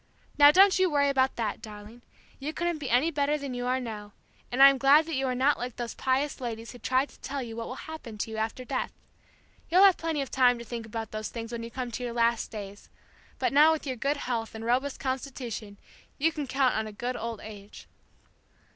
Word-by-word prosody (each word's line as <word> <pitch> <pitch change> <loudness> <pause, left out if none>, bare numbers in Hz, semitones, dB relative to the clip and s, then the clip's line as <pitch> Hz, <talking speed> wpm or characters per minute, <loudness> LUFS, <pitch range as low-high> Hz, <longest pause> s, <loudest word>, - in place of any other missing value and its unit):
'Now, 290 0 +8
don't 380 +4 +6
you 375 -1 +4
worry 285 -2 +2
about 265 -1 +2
that, 220 -3 -3
darling, 215 +2 -11 0.4
you 295 +3 -4
couldn't 345 -1 -1
be 275 -4 -4
any 255 +8 +3
better 290 0 +1
than 280 -3 -5
you 245 0 -3
are 255 +1 +1
now; 210 -4 -7 0.4
and 260 +3 +5
I 275 - +11
am 270 - -3
glad 285 +4 +6
that 325 - -5
you 265 -1 0
are 255 - -1
not 270 +4 +2
like 245 0 -5
these 240 -1 -5
pious 270 +2 -1
ladies 230 -2 -5
who 245 - -12
try 260 +2 +1
to - - -20
tell 275 -1 -4
you 225 -2 -7
what 230 0 -5
will 255 - -6
happen 310 -9 -8
to 220 - -3
you 220 - -5
after 225 +3 -3
death. - - -2 0.8
You'll 365 +4 +6
have 390 -3 +7
plenty 325 -3 -2
of 270 - -10
time 250 -2 +4
to 235 - -9
think 230 -1 -6
about 225 0 -5
those 215 0 -4
things 230 -1 -7
when 235 -1 -4
you 230 - -6
come 250 0 -5
to 250 - -5
your 240 -1 -3
last 235 -1 +1
days; 205 -2 -9 0.5
but - - 0
now 300 +3 +7
with 315 - -4
your 260 -2 -2
good 280 +5 -1
health 230 -5 -3
and 220 0 -6
robust 260 +4 0
constitution 255 -6 -5 0.4
you 325 +3 +2
can 295 -3 -5
count 260 0 +2
on 220 0 -1
a - - -7
good 245 +4 -4
old 230 -2 -4
age.'" 205 -1 -11
255 Hz, 235 wpm, -28 LUFS, 230-280 Hz, 0.8 s, I